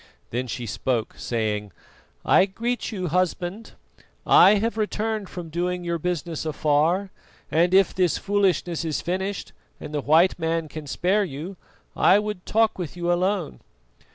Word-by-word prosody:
Then 125 +2 -2
she 120 0 -5
spoke, 115 +2 -2
saying: 105 -3 -2 0.5
"I 190 - +5
greet 235 +6 -3
you, 185 -5 -3
Husband. 185 +4 -2 0.5
I 200 - +7
have 225 +3 0
returned 215 -1 -2
from 175 -2 -7
doing 180 +2 -2
your 170 -1 -2
business 170 -1 -3
afar, 160 +5 +1 0.4
and 170 +4 +3
if 190 -1 +4
this 180 -3 +1
foolishness 190 -4 0
is 160 -2 -2
finished, 190 +3 -3 0.3
and 150 - -8
the 145 - -1
white 165 +6 +4
man 165 0 -1
can 155 0 -8
spare 195 +8 +1
you, 170 +3 -6 0.4
I 195 - +5
would 210 -3 -4
talk 220 -2 +2
with 175 -1 -5
you 175 0 +1
alone." 185 - -1
175 Hz, 150 wpm, -24 LUFS, 155-195 Hz, 0.5 s, I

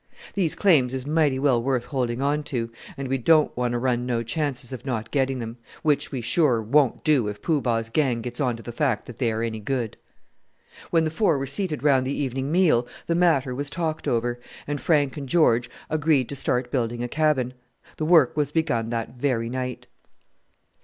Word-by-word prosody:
These 180 -6 +1
claims 140 -10 +3
is 130 0 -3
mighty 150 -3 +2
well 130 -3 +2
worth 125 -1 0
holding 125 -3 -2
on 145 +2 +1
to, 115 -4 -2 0.3
and 135 -1 -4
we 135 +1 0
don't 155 +4 +4
want 125 -1 -1
to - - 0
run 120 0 0
no 120 -2 0
chances 130 0 -2
of 130 - -7
not 120 -5 -3
getting 135 -2 +1
them 115 -1 -6 0.3
which 150 -3 +1
we, 130 -4 -3
sure, 125 0 +3
won't 125 +4 +2
do 145 -8 +3
if 105 0 -5
Poo 155 -4 0
Bah's 115 -2 -1
gang 125 -4 +1
gets 125 +2 -4
on 125 -4 +1
to 115 - -12
the 120 - -6
fact 125 -3 0
that 120 - -10
they 120 -3 +1
are 110 +1 -2
any 110 -1 -3
good." 115 0 -3 0.9
When 165 -2 +3
the 155 - -1
four 165 -3 +2
were 135 - -2
seated 150 0 -2
round 135 -3 +3
the 140 - -2
evening 135 0 -2
meal 155 -9 +3 0.2
the 170 - 0
matter 160 -7 +2
was 140 +2 -4
talked 160 -1 -3
over, 120 +1 0 0.3
and 145 -2 -3
Frank 145 -2 +2
and 140 -3 -6
George 120 -8 +3 0.2
agreed 150 -4 +1
to 140 - -4
start 125 -2 0
building 120 -2 -1
a - - -2
cabin. 145 -3 +1 0.4
The 155 - -2
work 160 -6 +5
was 145 -2 0
begun 120 -8 0
that 115 -1 -3
very 120 -4 0
night. 125 0 -4
130 Hz, 205 wpm, -24 LUFS, 120-150 Hz, 0.9 s, work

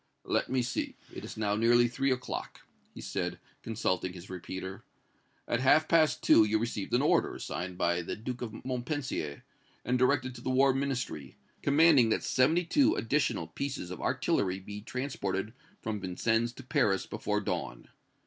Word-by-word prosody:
"Let - - 0
me 130 -1 +1
see, 120 - -3 0.2
it - - -7
is - - -8
now 105 -1 0
nearly 120 +2 +4
three 135 +3 0
o'clock," 125 -1 -4 0.3
he - - -10
said, - - -3 0.2
consulting 95 -5 -1
his 90 +1 -10
repeater; 95 +1 -6 0.6
"at 120 - 0
half 135 +4 +4
past 160 -2 +3
two 110 - +7
you 105 +1 +2
received 110 -3 -2
an - - +3
order, - - +2
signed 90 +3 -5
by 85 0 +1
the 85 - -4
Duke 120 +3 -6
of 120 0 -6
Montpensier, 125 - -3 0.4
and 125 +1 +1
directed 130 0 +2
to 120 - -10
the 130 - -3
War 135 +1 +4
Ministry, 135 -2 -3 0.2
commanding 145 -4 +5
that - - +1
seventy 160 +7 +3
two 285 - +3
additional 125 - 0
pieces 90 - -5
of 90 - -6
artillery 95 -1 0
be 100 +2 -8
transported 110 -5 -3 0.3
from 110 -2 -2
Vincennes 110 +5 0
to - - -11
Paris 125 -8 +1
before 105 -1 -2
dawn. 100 - -4
120 Hz, 165 wpm, -30 LUFS, 100-130 Hz, 0.6 s, two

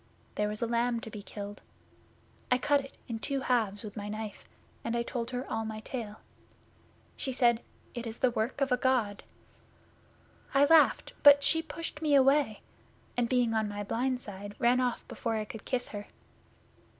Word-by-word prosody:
There 210 - 0
was 210 +2 -3
a - - +3
lamb 235 0 +1
to 225 -3 -8
be 210 - -7
killed. 205 0 -8 0.9
I 250 - +4
cut 285 +2 +3
it 275 - -15
in 230 -3 -4
two 275 +3 -2
halves 220 -6 +1
with 210 -2 -8
my 205 -1 -5
knife, 215 0 -6 0.4
and 230 - -1
told 235 -1 -3
her 250 +1 -4
all 225 0 -2
my 220 -1 -5
tale. 220 -3 -6 0.9
She 265 - -2
said, 240 -2 +3 0.3
"It 240 -1 -5
is 225 0 -6
the 255 - +3
work 235 +5 -2
of 275 -1 +2
a 250 - +4
God." 245 -6 +1 1.3
I 280 +1 +7
laughed, 320 +1 +5
but 285 0 +8
she 325 +2 +4
pushed 325 -1 -6
me 300 -2 +3
away, 275 -4 +4 0.5
and 240 -1 +1
being 245 -3 +2
on 220 -1 +1
my 205 0 -4
blind 250 +4 -1
side, 205 -1 -8
ran 245 +1 +3
off 250 -2 -1
before 230 -2 -3
I 215 -1 -1
could 215 0 -9
kiss 250 -2 -1
her. 205 -1 -7
235 Hz, 180 wpm, -30 LUFS, 215-260 Hz, 1.3 s, but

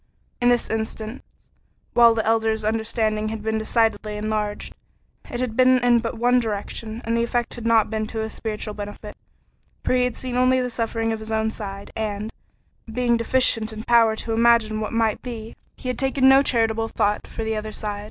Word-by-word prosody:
In 245 - +4
this 245 -1 +2
instance, 220 +2 -4 0.7
while 235 -1 +6
the 220 - -1
Elder's 220 -1 +1
understanding 220 -1 0
had 220 -1 -5
been 220 0 0
decidedly 220 -1 0
enlarged, 210 -1 -3 0.6
it 240 - -4
had 250 -3 -2
been 255 +1 +5
in 240 -1 +5
but 230 0 -4
one 245 +2 +3
direction, 220 +1 -4
and 230 +1 0
the 235 - +2
effect 240 0 -1
had 235 -1 -5
not 220 -2 +3
been 215 -1 -2
to 220 0 -4
his 220 0 -4
spiritual 215 -1 -4
benefit, 205 0 -8 0.7
for - - +1
he 250 0 +3
had 250 - -3
seen 250 -1 -4
only 255 +1 +4
the 250 -1 -2
suffering 225 -1 -1
of 220 - -4
his 220 0 -7
own 220 0 0
side, 200 -2 -7
and, 215 0 -3 0.6
being 240 +1 +1
deficient 230 -2 +2
in 220 0 -7
power 230 -2 +4
to 225 +1 -4
imagine 225 -2 +3
what 215 - -3
might 225 -2 +1
be, 230 -3 -7 0.2
he 255 - -6
had 250 - -3
taken 265 0 +2
no 270 +1 +7
charitable 225 -4 +1
thought 210 -2 -1
for 225 - -5
the 220 0 -1
other 215 0 -4
side. 210 -1 -4
225 Hz, 195 wpm, -23 LUFS, 215-235 Hz, 0.7 s, no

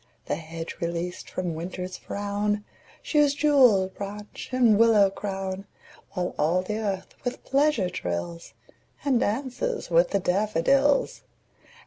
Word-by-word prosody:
The - - -1
hedge 165 0 -7
released 170 +1 -3
from 180 -2 -3
Winter's 180 +3 -5
frown 205 +1 -2 0.4
Shews 295 -2 +3
jewelled 250 -11 +4
branch 205 +1 -7
and 240 -5 +4
willow 215 -4 +6
crown; 195 -1 -4 0.5
While 180 -2 -2
all 175 +4 +2
the 210 +3 -3
earth 195 -3 -3
with 245 - -4
pleasure 275 -7 +2
trills, 165 - -5 0.5
And 265 -4 +3
'dances 265 - -2
with - - +5
the 200 - +1
daffodils. 215 - +2
200 Hz, 120 wpm, -26 LUFS, 180-245 Hz, 0.5 s, willow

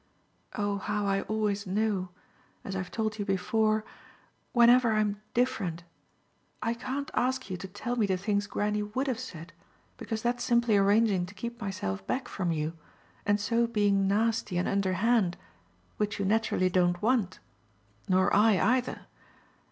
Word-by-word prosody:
Oh 205 -2 -1
how 210 +1 -2
I 195 0 +1
always 210 -2 -1
know 195 -1 0 0.5
as 195 - -5
I've 190 -2 -3
told 215 +2 -2
you - - 0
before 215 +3 +1 0.7
whenever 240 -1 +5
I'm 210 -1 0
different! 220 -10 0 0.8
I 230 - -1
can't 270 +5 -4
ask 255 -5 0
you 185 - -2
to 185 - -7
tell 205 +6 -4
me 220 -4 +2
the 190 -1 +1
things 205 +2 -1
Granny 210 +1 -1
WOULD 210 +6 -2
have 255 -4 -1
said, 170 -10 -8 0.4
because 220 -2 -4
that's 240 0 0
simply 235 -3 +3
arranging 200 -2 +3
to 205 - -13
keep 235 +4 -6
myself 100 - -3
back 260 - -2
from 180 -3 -2
you, 155 0 -2 0.5
and 205 0 +3
so 230 +3 +1
being 205 -3 +2
nasty 210 -1 +1
and 180 - 0
underhand, 195 0 +1 0.6
which 210 0 -1
you 200 - -1
naturally 200 -3 +1
don't 175 -1 +2
want, 225 -5 +1 0.7
nor 185 0 +3
I 210 0 +5
either. 250 +1 +1
210 Hz, 150 wpm, -29 LUFS, 190-230 Hz, 0.8 s, whenever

